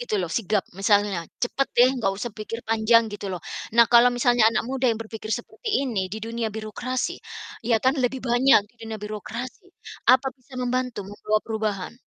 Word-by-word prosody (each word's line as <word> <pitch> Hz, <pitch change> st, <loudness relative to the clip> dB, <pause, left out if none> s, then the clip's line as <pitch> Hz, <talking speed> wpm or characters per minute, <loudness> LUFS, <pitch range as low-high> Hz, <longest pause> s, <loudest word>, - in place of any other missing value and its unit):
gitu 245 Hz, -3 st, -3 dB
loh, 175 Hz, -3 st, -2 dB
sigap, 210 Hz, -3 st, 0 dB
misalnya. 200 Hz, -1 st, +2 dB, 0.2 s
"Cepet 270 Hz, +3 st, -1 dB
deh, 245 Hz, +1 st, +7 dB
nggak 195 Hz, -, +1 dB
usah 230 Hz, +2 st, -5 dB
pikir 230 Hz, +1 st, -7 dB
panjang," 225 Hz, 0 st, +3 dB
gitu 205 Hz, -1 st, -5 dB
loh, 180 Hz, -3 st, -5 dB, 0.3 s
nah 235 Hz, -, +9 dB
kalau 240 Hz, +1 st, +8 dB
misalnya 245 Hz, -2 st, +4 dB
anak 230 Hz, -, 0 dB
muda 260 Hz, +1 st, 0 dB
yang 225 Hz, -, +1 dB
berpikir 220 Hz, -1 st, -8 dB
seperti 275 Hz, -, -2 dB
ini 200 Hz, -7 st, -2 dB
di 210 Hz, -, -6 dB
dunia 225 Hz, +1 st, -3 dB
birokrasi, 220 Hz, +4 st, -4 dB, 0.5 s
ya 230 Hz, -, +5 dB
kan, 260 Hz, +4 st, +2 dB
lebih 255 Hz, +1 st, -1 dB
banyak 245 Hz, 0 st, +5 dB
di -, -, -34 dB
dunia 225 Hz, -1 st, -6 dB
birokrasi 230 Hz, -, -7 dB, 0.4 s
apa 260 Hz, +1 st, +5 dB
bisa 255 Hz, 0 st, -15 dB
membantu 250 Hz, -3 st, -2 dB
membawa 205 Hz, +2 st, -1 dB
perubahan? 215 Hz, -4 st, -3 dB
230 Hz, 180 wpm, -24 LUFS, 215-250 Hz, 0.5 s, nah